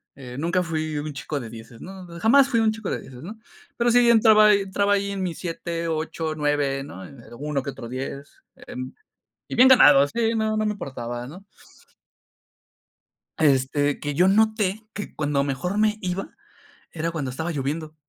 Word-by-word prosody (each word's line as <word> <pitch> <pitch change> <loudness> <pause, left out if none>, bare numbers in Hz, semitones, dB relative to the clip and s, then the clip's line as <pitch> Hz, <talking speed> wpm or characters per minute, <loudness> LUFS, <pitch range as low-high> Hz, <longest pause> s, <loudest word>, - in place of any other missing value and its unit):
eh, 125 -2 -10
nunca 170 +4 +1
fui 155 -2 -3
un 150 0 -5
chico 145 +1 -4
de 120 -4 -8
dieces, 115 +1 -12
¿no? 190 0 -9
Jamás 265 +8 +5
fui 230 - +2
un 220 -1 +3
chico 220 -2 -6
de - - -2
dieces, 125 0 -12
¿no? 215 +6 -9 0.4
Pero 240 0 +2
sí, 240 0 +5
entraba 220 -2 +6
ahi 205 -1 +5
entraba 200 +1 0
ahí 200 0 0
en 195 -1 -3
mis 175 -3 -4
7 170 -1 -4
8 160 0 -3
9 145 -2 0
¿no? 95 -9 -10
En 135 +2 -13
eh, - - -16
uno 145 -2 -2
que - - -5
otro 120 -3 -9
10 135 +2 -7 0.2
en 255 +1 -7 0.6
y - - -5
bien 255 +2 +7
ganado, 145 - +7
sí, 230 +5 0
no, 220 0 0
no 215 0 0
me 210 - 0
importaba, 120 - -6
¿no? 180 +9 -12 1.9
Este, 145 0 +2
que 145 -1 -3
yo 180 +6 +4
noté 215 0 +1
que 205 - -7
cuando 145 -2 0
mejor 180 +9 -2
me 215 0 +2
iba 185 +1 -4 0.6
era 165 0 -3
cuando 145 -6 -4
estaba 160 +7 -4
lloviendo. 155 +2 -4
165 Hz, 185 wpm, -24 LUFS, 140-210 Hz, 1.9 s, bien